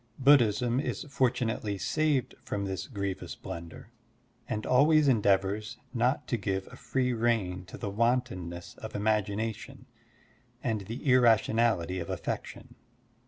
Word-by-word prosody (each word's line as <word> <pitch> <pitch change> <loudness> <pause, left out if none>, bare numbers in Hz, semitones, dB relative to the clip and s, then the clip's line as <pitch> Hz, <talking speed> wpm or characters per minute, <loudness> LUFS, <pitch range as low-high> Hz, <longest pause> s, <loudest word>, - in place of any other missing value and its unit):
Buddhism 125 -3 +4
is 145 - -3
fortunately 115 -5 0
saved 150 +2 0
from 100 -1 -3
this 95 -1 -4
grievous 100 -6 -4
blunder, 85 -1 -9 0.6
and 110 0 -2
always 150 +3 +5
endeavors 105 0 +2 0.2
not 125 +3 +1
to 120 - +1
give 95 -2 -2
a - - -10
free 125 -1 -1
rein 110 -6 0
to - - -10
the 100 - -4
wantonness 100 -7 -1
of - - -8
imagination 110 +4 -1 0.8
and 110 -4 -1
the 115 +3 -5
irra 125 -5 +6
tionality 105 -6 0
of 85 - -6
affection. - - -5
110 Hz, 125 wpm, -29 LUFS, 100-125 Hz, 0.8 s, irra